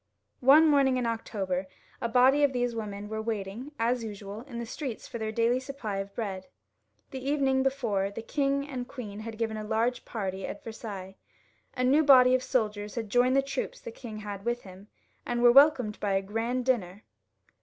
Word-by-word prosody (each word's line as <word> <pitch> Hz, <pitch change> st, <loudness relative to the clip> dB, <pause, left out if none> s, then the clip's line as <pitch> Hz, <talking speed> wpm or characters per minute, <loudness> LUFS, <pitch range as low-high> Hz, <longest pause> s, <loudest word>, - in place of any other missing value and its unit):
One 285 Hz, +5 st, +7 dB
morning 275 Hz, -3 st, +4 dB
in 250 Hz, -, -1 dB
October 195 Hz, -5 st, -2 dB, 0.3 s
a 235 Hz, -, -1 dB
body 260 Hz, +5 st, +5 dB
of 280 Hz, -2 st, +3 dB
these 245 Hz, -1 st, 0 dB
women 210 Hz, -2 st, -5 dB
were 220 Hz, +1 st, -4 dB
waiting 220 Hz, +4 st, -4 dB
as 235 Hz, +1 st, 0 dB
usual 205 Hz, -1 st, -7 dB
in 240 Hz, -4 st, -7 dB
the 235 Hz, -, -4 dB
streets 250 Hz, 0 st, -6 dB
for 235 Hz, -, -6 dB
their 220 Hz, 0 st, -2 dB
daily 235 Hz, +3 st, +2 dB
supply 260 Hz, -7 st, -5 dB
of 195 Hz, 0 st, -5 dB
bread. 195 Hz, -5 st, -4 dB, 0.6 s
The 260 Hz, -1 st, -6 dB
evening 270 Hz, -1 st, +2 dB
before 235 Hz, -8 st, 0 dB
the 210 Hz, +3 st, -7 dB
king 280 Hz, +1 st, 0 dB
and 250 Hz, -3 st, -5 dB
queen 215 Hz, -6 st, -7 dB
had 220 Hz, 0 st, -7 dB
given 220 Hz, -1 st, -2 dB
a 215 Hz, -, -4 dB
large 225 Hz, +3 st, 0 dB
party 195 Hz, -4 st, -4 dB
at -, -, -7 dB
Versailles. 200 Hz, -4 st, -7 dB, 0.6 s
A 255 Hz, -, +1 dB
new 280 Hz, +5 st, +4 dB
body 255 Hz, -3 st, +7 dB
of 255 Hz, -, +3 dB
soldiers 210 Hz, -5 st, -1 dB
had 225 Hz, -4 st, -4 dB
joined 250 Hz, +1 st, +4 dB
the 275 Hz, -, +4 dB
troops 275 Hz, -, -4 dB
the 475 Hz, -, -8 dB
king 225 Hz, -, -8 dB
had 200 Hz, -2 st, -6 dB
with 240 Hz, +2 st, -2 dB
him, 190 Hz, +1 st, -13 dB, 0.4 s
and 240 Hz, 0 st, -1 dB
were 240 Hz, -, +8 dB
wel 280 Hz, +4 st, +9 dB
comed 240 Hz, -8 st, -6 dB
by 205 Hz, -2 st, 0 dB
a 195 Hz, 0 st, +1 dB
grand 230 Hz, +5 st, -2 dB
dinner. 205 Hz, -6 st, -1 dB
230 Hz, 195 wpm, -28 LUFS, 210-260 Hz, 0.6 s, wel